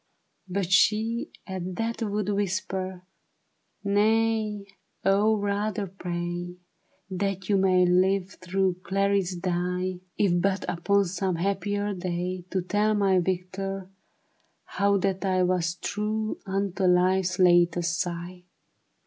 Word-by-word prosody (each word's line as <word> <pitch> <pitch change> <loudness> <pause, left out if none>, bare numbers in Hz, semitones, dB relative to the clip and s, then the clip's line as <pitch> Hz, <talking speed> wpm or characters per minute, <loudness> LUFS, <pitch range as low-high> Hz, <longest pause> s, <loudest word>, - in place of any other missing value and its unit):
But 185 -1 -2
she 220 +4 +3 0.2
at 185 -1 -5
that 230 +2 -2
would 210 -2 -1
whisper 190 -2 -2 0.4
" - - -47
Nay, 215 0 +1 0.4
O 205 +3 +4
rather 205 0 -1
pray 175 -1 -4 0.6
That 195 0 -2
you 200 - +4
may 185 -1 +4
live 185 +1 +2 0.2
though 190 -1 +2
Clarice 195 -1 +1
die; 180 +1 -2 0.2
If 175 -4 +2
but 195 +1 0
upon 200 +4 +2
some 185 0 -1
happier 205 +3 -1
day 180 0 -3
To 185 -1 -1
tell 210 +3 +1
my 195 -2 +3
Victor, 190 +1 -3 0.7
how 200 0 +1
that 195 0 -1
I 185 -1 +2
Was 180 -2 +1
true 215 +3 -2
unto 195 0 -1
life's 185 0 +3
latest 175 -1 +3
sigh." 175 +1 -4
190 Hz, 115 wpm, -26 LUFS, 180-200 Hz, 0.7 s, O